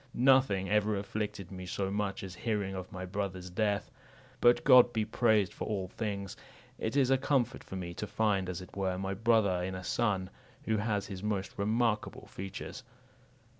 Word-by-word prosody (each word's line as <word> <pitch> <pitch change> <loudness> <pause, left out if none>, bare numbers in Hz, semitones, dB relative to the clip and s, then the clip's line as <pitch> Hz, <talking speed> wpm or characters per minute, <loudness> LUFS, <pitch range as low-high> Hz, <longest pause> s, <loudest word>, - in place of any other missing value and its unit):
Nothing 125 -7 +4
ever 105 +1 +2
afflicted 100 -2 -4
me 90 -1 -7
so 95 +2 -2
much 105 +1 -2
as 95 -2 -6
hearing 100 -1 -2
of 95 -1 -6
my 95 -1 -5
brother's 95 -1 -4
death. 105 +5 0 0.5
But 120 0 +5
God 125 -3 +8
be 110 -2 0
praised 110 -5 +2
for - - -5
all 95 -4 -2
things! 100 -2 -4 0.4
It 110 - -2
is 135 -2 +4
a 135 - +4
comfort 135 -3 +1
for - - -8
me 90 -2 -4
to 105 +4 -5
find, 105 -3 +1
as 90 0 -4
it 90 - -12
were, 95 -2 -1
my 95 +1 -2
brother 105 -3 +3
in 95 +1 -3
a 95 - -6
son, 95 -2 0 0.3
who 110 -1 +1
has 105 -1 0
his 95 -2 -7
most 105 -2 -2
remarkable 110 +1 0
features." 95 0 -7
100 Hz, 180 wpm, -31 LUFS, 95-110 Hz, 0.5 s, God